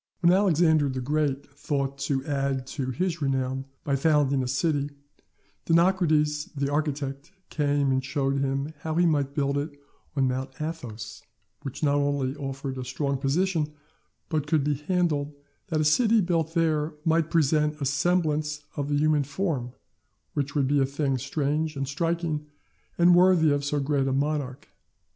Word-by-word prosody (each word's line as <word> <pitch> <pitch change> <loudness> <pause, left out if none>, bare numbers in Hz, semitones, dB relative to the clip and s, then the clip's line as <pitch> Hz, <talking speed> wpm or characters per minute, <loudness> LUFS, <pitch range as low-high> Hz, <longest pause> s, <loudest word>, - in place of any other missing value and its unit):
When 175 0 +5
Alexander 165 -6 +3
the 130 0 -3
Great 140 +1 -1
thought 140 -1 -2
to 140 -1 -1
add 140 -3 -1
to 135 -4 -3
his 170 +4 -2
renown 135 -1 -1 0.2
by 140 - 0
founding 140 -2 +2
a 130 - -2
city, 145 +2 0 0.8
Dinocrates 165 -4 +3
the 140 0 -1
architect 145 -1 -2 0.2
came 145 -2 +1
and 130 0 +1
showed 135 0 -1
him 135 +2 -1
how 160 +1 -3
he 175 +1 +4
might 145 -4 +1
build 140 -1 +1
it 145 0 -6 0.4
on 135 -2 +2
Mount 130 +1 -4
Athos, 115 -9 -6 0.4
which 135 +3 -6
not 145 -1 +3
only 140 -2 0
offered 135 -1 -5
a - - -3
strong 135 +2 -2
position, 150 +2 0 0.5
but 155 -3 -1
could 150 -2 +2
be 150 +1 +1
handled 150 -1 -1 0.3
that 165 -5 -1
the 155 - +1
city 225 +8 +4
built 165 -3 0
there 155 -2 +1
might 165 0 +2
present 150 -1 +2
a 140 - -2
semblance 150 0 0
of 145 -1 -3
the 145 - +1
human 150 -1 +3
form, 145 -5 -2 0.6
which 145 0 -2
would 140 -3 +2
be 145 +1 +2
a 135 - +3
thing 140 -1 -1
strange 150 +3 -1
and 135 -1 -2
striking, 165 0 -2 0.5
and 175 +1 +6
worthy 175 -3 +5
of 145 0 0
so 145 +1 0
great 140 -1 0
a 135 - 0
monarch. 140 -1 -2
145 Hz, 160 wpm, -26 LUFS, 135-160 Hz, 0.8 s, and